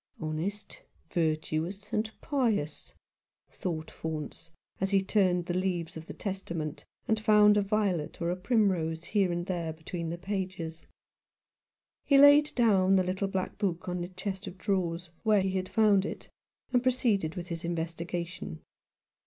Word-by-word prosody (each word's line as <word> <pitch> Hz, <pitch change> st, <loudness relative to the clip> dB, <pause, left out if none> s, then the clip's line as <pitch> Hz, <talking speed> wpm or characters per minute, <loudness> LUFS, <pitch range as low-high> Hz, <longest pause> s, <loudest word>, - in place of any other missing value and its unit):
" -, -, -33 dB
Honest, 160 Hz, +7 st, -4 dB, 0.3 s
virtuous, 165 Hz, +5 st, -1 dB
and 215 Hz, +1 st, +1 dB
pious," 225 Hz, -, -1 dB, 0.6 s
thought 160 Hz, -3 st, -4 dB
Faunce, 160 Hz, 0 st, -6 dB, 0.3 s
as 195 Hz, -, +1 dB
he 195 Hz, -1 st, +3 dB
turned 185 Hz, -3 st, +2 dB
the 175 Hz, -, -2 dB
leaves 180 Hz, -3 st, -1 dB
of 160 Hz, 0 st, -8 dB
the -, -, -6 dB
Testament, 170 Hz, -6 st, -4 dB, 0.2 s
and 220 Hz, -1 st, +2 dB
found 210 Hz, -1 st, +6 dB
a 205 Hz, -, +4 dB
violet 195 Hz, -6 st, 0 dB
or 170 Hz, 0 st, 0 dB
a -, -, 0 dB
primrose 180 Hz, -6 st, +1 dB
here 195 Hz, -1 st, +1 dB
and 175 Hz, 0 st, -2 dB
there 175 Hz, -3 st, -2 dB
between 165 Hz, +1 st, -5 dB
the 170 Hz, -, -4 dB
pages. 185 Hz, -4 st, -4 dB, 1.2 s
He 280 Hz, -, +4 dB
laid 285 Hz, +2 st, +7 dB
down 195 Hz, -6 st, +4 dB
the 185 Hz, -, +4 dB
little 190 Hz, +2 st, -1 dB
black 190 Hz, +1 st, -3 dB
book 185 Hz, -4 st, -1 dB
on 180 Hz, 0 st, -2 dB
the 175 Hz, -, -3 dB
chest 190 Hz, +2 st, -5 dB
of 185 Hz, -, -8 dB
drawers, 180 Hz, -4 st, -1 dB
where 215 Hz, -3 st, +4 dB
he 190 Hz, 0 st, 0 dB
had 185 Hz, 0 st, -2 dB
found 210 Hz, -4 st, +4 dB
it, -, -, -6 dB, 0.4 s
and 245 Hz, -, +4 dB
proceeded 235 Hz, -10 st, +1 dB
with 180 Hz, 0 st, -6 dB
his 170 Hz, -1 st, -4 dB
investigation. 170 Hz, -, -4 dB
185 Hz, 155 wpm, -30 LUFS, 170-205 Hz, 1.2 s, laid